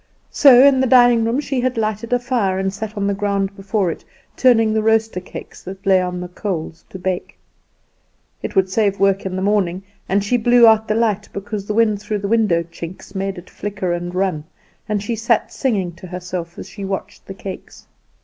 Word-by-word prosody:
So 260 -3 +7
in 275 -2 +5
the 260 - +2
dining 245 -2 +5
room 235 +4 0
she 270 -3 -2
had 255 -1 -1
lighted 220 +1 -2
a 245 - +4
fire, 240 -7 -1
and 190 0 -1
sat 215 +1 -6
on 200 - -1
the 200 - +1
ground 200 -1 -1
before 195 -2 -1
it, - - -9 0.3
turning 225 -4 +4
the 220 - +1
roaster 220 -2 +1
cakes 180 - -10
that 195 +2 -10
lay 190 -1 +4
on 180 0 -3
the 180 - -5
coals 175 -3 -5
to - - -8
bake. 185 0 -4 1.0
It - - -5
would 190 -1 +3
save 200 0 0
work 195 0 +2
in 185 - -5
the 190 - -2
morning; 195 -3 0 0.3
and 195 +1 +2
she 245 +5 +1
blew 240 +1 +5
out 220 -1 +5
the 215 - 0
light 215 -3 0
because 200 0 -5
the 210 - -2
wind 215 -3 +2
through 210 0 -2
the 200 0 -4
window 210 -6 +2
chinks 170 +3 -10
made 195 0 -3
it 175 - -10
flicker 205 -3 -3
and 175 +1 -4
run; 185 -5 0 0.5
and 205 -1 -1
she 230 +2 -2
sat 225 0 0
singing 200 -9 -1
to 185 - -10
herself 180 -1 -6
as - - -8
she 205 - -9
watched 195 0 -5
the 195 - -7
cakes. 190 -1 -9
200 Hz, 210 wpm, -19 LUFS, 185-225 Hz, 1.0 s, So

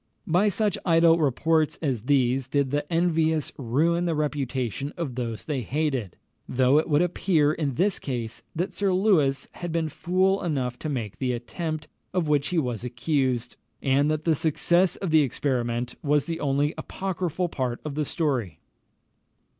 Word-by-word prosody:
By 190 +3 +3
such 205 0 0
idle 165 -1 +5
reports 155 +2 +2
as 130 -8 -2
these 130 -2 +2
did 140 -1 0
the 145 +2 -2
envious 160 -2 +1
ruin 155 +8 +1
the 165 -2 0
reputation 140 -3 -2
of 160 -7 -3
those 115 -3 -4
they 145 -4 -2
hated; 130 - -2 0.3
though 130 +3 +4
it 160 - -2
would 150 +2 +4
appear 160 -4 +2
in 145 -5 -2
this 195 +5 +1
case 120 -5 -4
that 175 +3 -2
Sir 200 -1 +1
Lewis 155 -9 +2
had 175 -1 -6
been 160 -1 0
fool 185 +4 +1
enough 130 -8 -2
to 155 - -4
make 115 -8 -4
the 130 -2 0
attempt 155 +6 -4 0.3
of 175 -4 +1
which 145 -2 +2
he 180 - -1
was 125 -7 -1
accused, 125 -1 -1 0.2
and 140 +2 +2
that 155 0 -1
the 165 - +3
success 170 +4 +2
of 190 -5 -4
the 155 -1 +6
experiment 125 -3 -1
was 145 -1 +2
the 165 -1 -3
only 145 +2 +1
apocryphal 180 -2 -2
part 130 -7 -3
of 150 - -3
the 150 +2 -1
story. 135 - -1
150 Hz, 165 wpm, -26 LUFS, 130-165 Hz, 0.3 s, the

